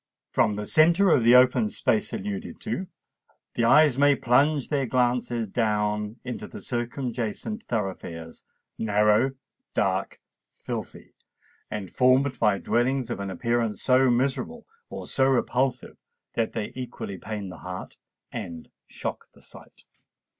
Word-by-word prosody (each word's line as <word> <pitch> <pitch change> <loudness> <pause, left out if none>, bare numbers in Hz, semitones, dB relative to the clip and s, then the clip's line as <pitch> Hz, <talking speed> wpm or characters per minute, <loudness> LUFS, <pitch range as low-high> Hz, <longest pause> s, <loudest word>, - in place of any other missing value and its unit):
From 105 - +2
the 105 0 -4
centre 170 - +5
of 125 - +4
the 120 +2 +7
open 125 - +5
space 215 0 0
alluded 205 +1 -5
to, 190 -4 -3 0.7
the 115 - +1
eyes 145 +1 +5
may 145 0 +5
plunge 140 +4 +2
their 140 -4 0
glances 120 -2 0
down 105 0 0
into 125 -1 -5
the - - -10
circumjacent 120 - -4
thoroughfares—narrow, 105 +4 -1 0.4
dark, - - 0 0.4
filthy, - - -7 0.6
and 100 -4 -5
formed 130 +1 +3
by 105 -3 +3
dwellings 125 +2 0
of - - -3
an 100 -1 -4
appearance 115 +3 -1
so 130 0 +4
miserable 135 - -1 0.2
or - - -7
so 135 -1 +2
repulsive 130 0 0 0.4
that 115 -1 -1
they 105 -2 -3
equally 120 -6 -6
pain 105 -2 -5
the 90 - -10
heart 90 0 -7 0.3
and 90 -9 -7 0.2
shock - - -5
the - - -19
sight. - - -13
120 Hz, 130 wpm, -26 LUFS, 105-135 Hz, 0.7 s, the